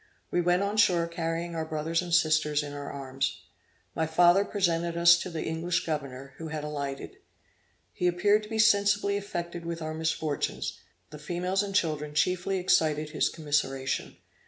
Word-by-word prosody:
We 175 - +2
went 180 +2 +2
on 205 +2 -2
shore 180 -6 +4
carrying 170 0 -3
our 160 -1 -2
brothers 160 +2 -1
and 175 -1 -7
sisters 155 -3 +3
in 145 -1 -7
our 145 0 -6
arms. 135 -1 -3 0.6
My 160 - -1
father 175 +4 +5
presented 170 -4 0
us 170 0 +7
to 185 - -5
the 165 -2 -4
English 165 +2 -1
governor, 140 -4 -5
who 165 - -6
had 155 -1 -4
alighted; 140 -2 -5 0.8
he 180 - 0
appeared 205 +5 +3
to 210 - -11
be 225 - -3
sensibly 205 -2 +3
affected 175 -4 -4
with 170 0 -4
our 155 -1 -4
misfortunes, 160 -2 -2 0.3
the 150 - -9
females 180 +5 -1
and 200 -1 -4
children 150 -5 0
chiefly 180 +4 +1
excited 155 -4 +1
his 155 - +1
commiseration. 145 -4 -2
165 Hz, 165 wpm, -28 LUFS, 150-180 Hz, 0.8 s, us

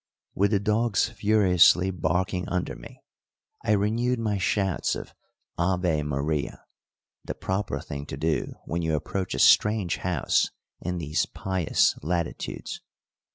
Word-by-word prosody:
With 100 +1 +2
the 100 -2 +2
dogs 105 +1 +1
furiously 95 -4 +4
barking 90 +2 -1
under 90 0 -2
me, - - -13 0.6
I 105 - +2
renewed 115 +5 +1
my 105 -3 -1
shouts 95 -2 0
of - - -8 0.5
"Ave 90 -3 +1
Maria" 75 +1 -2 0.6
the - - -5
proper 95 +2 -2
thing 70 0 -7
to - - -6
do 80 0 -1
when 85 +2 -2
you 80 -1 0
approach 95 +4 -3
a - - -4
strange 105 -5 +4
house 90 -2 +1 0.3
in 90 +1 -3
these 75 -2 -1
pious 95 -4 +1
latitudes. 85 +2 -3
90 Hz, 130 wpm, -26 LUFS, 80-100 Hz, 0.6 s, furiously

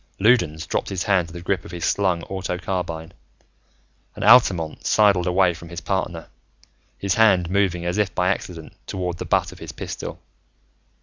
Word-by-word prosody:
Loudons 90 -8 +3
dropped - - -2
his 95 -3 -2
hand 95 -4 +2
to 80 - -13
the 85 - -7
grip 95 -2 -1
of - - -11
his 85 -1 -4
slung 90 -4 +1
auto 95 -2 -4
carbine 85 -3 -4 1.0
and - - -5
Altamont 90 -10 +5
sidled 100 -4 +3
away 90 0 +3
from 85 0 -11
his 85 0 -6
partner, 90 -4 -3 0.7
his 100 -2 0
hand 95 -6 +4
moving 95 -3 +1
as 90 +4 -1
if 100 -2 0
by 90 +1 +2
accident 85 -4 -4
toward 90 -2 -4
the - - -4
butt - - +1
of - - -13
his - - -7
pistol. - - -6
90 Hz, 175 wpm, -22 LUFS, 85-95 Hz, 1.0 s, Altamont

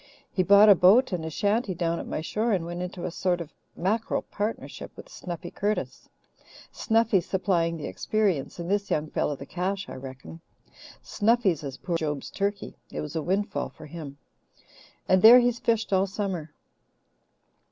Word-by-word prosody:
He 185 - +1
bought 200 +3 +7
a 205 - +10
boat 200 +8 +5
and 175 -3 -2
a 160 - -3
shanty 205 +4 0
down 170 0 -1
at - - -7
my - - -3
shore 215 +7 -1
and 175 -4 0
went 175 +1 -5
into 180 0 -5
a 180 - -3
sort 180 +1 0
of 165 -2 -8 0.2
mackerel 215 +5 -1
partnership 210 +2 -5
with - - -11
Snuffy 175 - -7
Curtis 210 +1 -3 0.6
Snuffy 225 -4 +2
supplying 170 -2 0
the 155 - -6
experience 195 -11 -1
and 170 -1 -5
this 200 +1 0
young 150 0 -1
fellow 145 - 0
the 140 - -9
cash, 190 +4 -3
I - - -7
reckon. 130 +5 -10 0.6
Snuffy's 210 -7 +1
as 135 -2 -6
poor 175 - -5
as 165 - +1
Job's 150 -3 -3
turkey; 200 0 -3
it - - -5
was 150 +1 -7
a 160 - 0
windfall 195 +6 -1
for - - -13
him. 150 -2 -8 0.9
And 185 0 +4
there 235 +3 +10
he's 245 -1 +1
fished 225 -3 0
all 190 +1 +3
summer." 190 -6 -4
185 Hz, 175 wpm, -26 LUFS, 165-205 Hz, 0.9 s, a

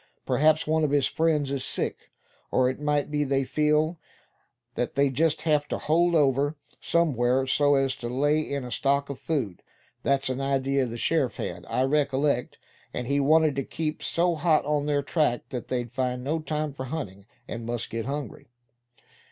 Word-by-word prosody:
Perhaps 155 +1 +3
one 160 0 +1
of 150 - +2
his 145 -1 +3
friends 155 -4 +1
is 135 -2 -1
sick; - - -2 0.4
or 130 0 +3
it 130 - -10
might 150 0 0
be 150 0 +1
they 135 -1 +1
feel 150 +4 +1 0.7
that 120 - -3
they 140 -1 +3
just 160 +3 +1
have 150 -2 +2
to - - -2
hold 170 +2 +2
over 145 0 +2 0.2
somewhere, 130 -6 +2
so 145 +2 +3
as 135 -1 +1
to 120 - -5
lay 145 +5 +2
in 140 -3 -3
a 125 - -7
stock 140 +1 +1
of 135 - -8
food. 125 - -2 0.4
That's 140 0 +1
an 130 +1 -2
idea 135 -1 +1
the 115 0 -6
sheriff 145 0 0
had, - - -5
I 130 - 0
recollect; 140 -2 +1 0.3
and 125 - -4
he 140 +3 +1
wanted 155 +1 +4
to 135 - 0
keep 155 +3 -4
so 175 +1 +1
hot 155 -2 +2
on 150 0 0
their 145 -1 +1
track 140 -4 0
that 125 -2 -5
they'd 120 -2 -3
find 125 -1 -2
no 155 +4 -1
time 155 -1 -3
for 130 -1 -6
hunting, 100 - -6 0.2
and 115 +2 -5
must 120 -1 -3
get 115 +1 -3
hungry." 140 -4 -5
140 Hz, 185 wpm, -26 LUFS, 130-150 Hz, 0.7 s, wanted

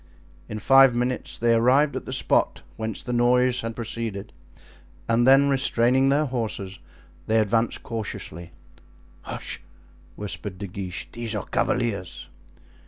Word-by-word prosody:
In 110 - -4
five 135 +3 +6
minutes 125 +1 -2
they 115 0 +2
arrived 130 +6 +3
at - - -5
the - - -5
spot - - +1
whence 110 -1 -4
the 125 - -4
noise 125 +1 +3
had 115 0 -5
proceeded, 115 -3 -4 0.7
and 115 +2 +2
then 135 +1 +6
restraining 130 -1 +3
their 145 +2 +2
horses, 110 -7 -4 0.5
they 110 - +2
advanced 115 +2 +1
cautiously. 90 -6 -6 0.7
"Hush," - - -6 0.5
whispered 100 -2 -4
De 100 - -5
Guiche, 95 -1 -6
"these 115 -2 -4
are 105 - -3
cavaliers." 110 -7 -2
115 Hz, 130 wpm, -24 LUFS, 105-125 Hz, 0.7 s, five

